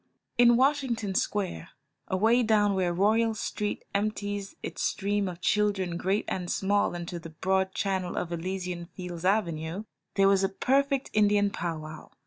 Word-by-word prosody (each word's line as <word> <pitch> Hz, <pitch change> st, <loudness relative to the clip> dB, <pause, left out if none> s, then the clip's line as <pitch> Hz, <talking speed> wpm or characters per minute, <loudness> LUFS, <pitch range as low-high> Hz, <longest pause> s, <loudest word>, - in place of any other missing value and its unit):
In 240 Hz, -1 st, +7 dB
Washington 260 Hz, -7 st, +1 dB
Square, 190 Hz, -3 st, -1 dB, 0.4 s
away 220 Hz, +6 st, +3 dB
down 210 Hz, -3 st, +3 dB
where 185 Hz, -2 st, +1 dB
Royal 220 Hz, +5 st, +2 dB
Street 210 Hz, -1 st, -3 dB
empties 205 Hz, -1 st, -2 dB
its -, -, -5 dB
stream 205 Hz, 0 st, 0 dB
of 175 Hz, 0 st, -9 dB
children 200 Hz, -4 st, +1 dB
great 190 Hz, +4 st, 0 dB
and 180 Hz, -2 st, -3 dB
small 200 Hz, -2 st, +1 dB
into 175 Hz, 0 st, -5 dB
the 165 Hz, 0 st, -9 dB
broad 190 Hz, +4 st, 0 dB
channel 190 Hz, -3 st, -1 dB
of 170 Hz, -, -2 dB
Elysian 180 Hz, 0 st, -4 dB
Fields 180 Hz, -1 st, -7 dB
Avenue, 170 Hz, -2 st, 0 dB, 0.3 s
there 195 Hz, -1 st, +5 dB
was 195 Hz, 0 st, +4 dB
a 195 Hz, -, +2 dB
perfect 275 Hz, +6 st, +1 dB
Indian 205 Hz, -1 st, +3 dB
pow 170 Hz, -4 st, -3 dB
wow. 155 Hz, 0 st, -9 dB
195 Hz, 150 wpm, -28 LUFS, 180-210 Hz, 0.4 s, In